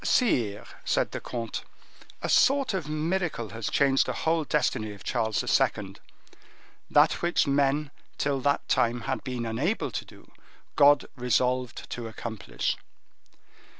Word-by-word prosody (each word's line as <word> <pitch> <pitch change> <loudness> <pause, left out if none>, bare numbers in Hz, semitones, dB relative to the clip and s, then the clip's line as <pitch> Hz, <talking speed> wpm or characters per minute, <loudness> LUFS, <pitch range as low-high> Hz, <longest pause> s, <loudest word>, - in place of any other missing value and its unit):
"Sire," 115 - +1 0.2
said - - +1
the - - -4
comte, 115 -2 -5 0.6
"a - - 0
sort 275 -3 +4
of 175 -6 -3
miracle 155 - -1
has 115 -1 -4
changed 135 -1 +3
the 130 - -1
whole 160 0 +2
destiny 110 -8 0
of 100 - -13
Charles 110 -3 0
II. - - +1 0.9
That - - +4
which 170 0 +2
men, 140 +1 +1 0.3
till 140 -2 0
that 140 +2 +1
time, 120 0 +2
had 130 +1 -3
been 125 -3 -3
unable 135 - -1
to - - -3
do, - - -17 0.4
God 145 -1 +6
resolved 125 0 0
to 120 -1 -4
accomplish." 110 - -3
130 Hz, 135 wpm, -27 LUFS, 115-150 Hz, 0.9 s, God